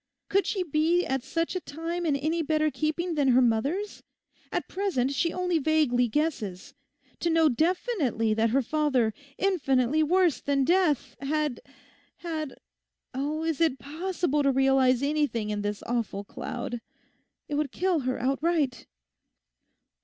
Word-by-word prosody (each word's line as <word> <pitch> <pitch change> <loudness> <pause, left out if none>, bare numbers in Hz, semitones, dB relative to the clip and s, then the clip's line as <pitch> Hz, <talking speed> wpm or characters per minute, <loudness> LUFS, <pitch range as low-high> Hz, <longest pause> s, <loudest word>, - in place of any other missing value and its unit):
Could 395 +1 +2
she 385 -3 0
be 330 +2 +2
at 265 0 -1
such 330 +7 -2
a - - 0
time 335 +3 -4
in 290 - +2
any 315 +4 0
better 310 0 +1
keeping 320 +4 -1
than 290 -3 +1
her 255 -1 +5
mother's? 275 - 0 0.5
At - - -2
present 360 -10 -1
she 335 +4 +1
only 360 -2 0
vaguely 280 -5 +2
guesses. 220 - -2 0.5
To 340 - 0
know 325 -1 +4
definitely 300 - 0
that 225 +1 +2
her 265 +4 +2
father, 265 -5 +1 0.2
infinitely 295 -7 +2
worse 350 0 +3
than 280 -1 +1
death, 340 -5 +2
had—had—Oh, 300 0 -5
is 325 -1 -1
it 320 -5 +3
possible 315 0 -1
to 275 -1 +3
realise 265 -1 +3
anything 280 -7 0
in 205 -1 -2
this 205 0 -3
awful 230 -4 -2
cloud? 245 +1 -5 0.7
It - - -6
would 290 -2 0
kill 365 -2 +1
her 255 -2 -2
outright. 275 +1 0
295 Hz, 140 wpm, -27 LUFS, 255-330 Hz, 0.7 s, her